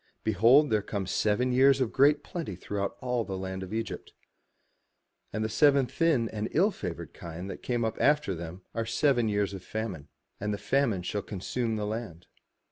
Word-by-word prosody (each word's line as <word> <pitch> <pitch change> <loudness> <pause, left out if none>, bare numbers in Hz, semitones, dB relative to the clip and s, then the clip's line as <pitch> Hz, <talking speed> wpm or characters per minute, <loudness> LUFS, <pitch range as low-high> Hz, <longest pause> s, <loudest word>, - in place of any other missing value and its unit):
Behold 115 +8 +5
there 105 -1 +3
come 100 -1 -3
seven 110 +6 +1
years 135 +2 +5
of 130 -4 0
great 145 +2 +4
plenty 165 - -5
throughout 100 +2 -4
all 125 -2 0
the 95 -3 -5
land 95 0 -4
of 95 - -7
Egypt: 115 0 -4 1.2
and 110 +1 -2
the - - +1
seven 140 +5 +4
thin 145 -5 +1
and 110 0 -3
ill 195 +7 +4
favoured 85 - -6
kine 85 +1 -7
that 95 - -7
came 120 -2 -1
up 110 0 -3
after 150 -8 +3
them 85 +2 -7
are 115 - -1
seven 120 0 +2
years 100 -1 0
of 95 - -6
famine, 105 -10 -5 0.3
and 105 +1 -2
the 105 - -1
famine 120 -7 +1
shall 100 +3 -2
consume 110 +4 -3
the 105 -1 -2
land. 105 -6 -5
110 Hz, 185 wpm, -29 LUFS, 95-130 Hz, 1.2 s, Behold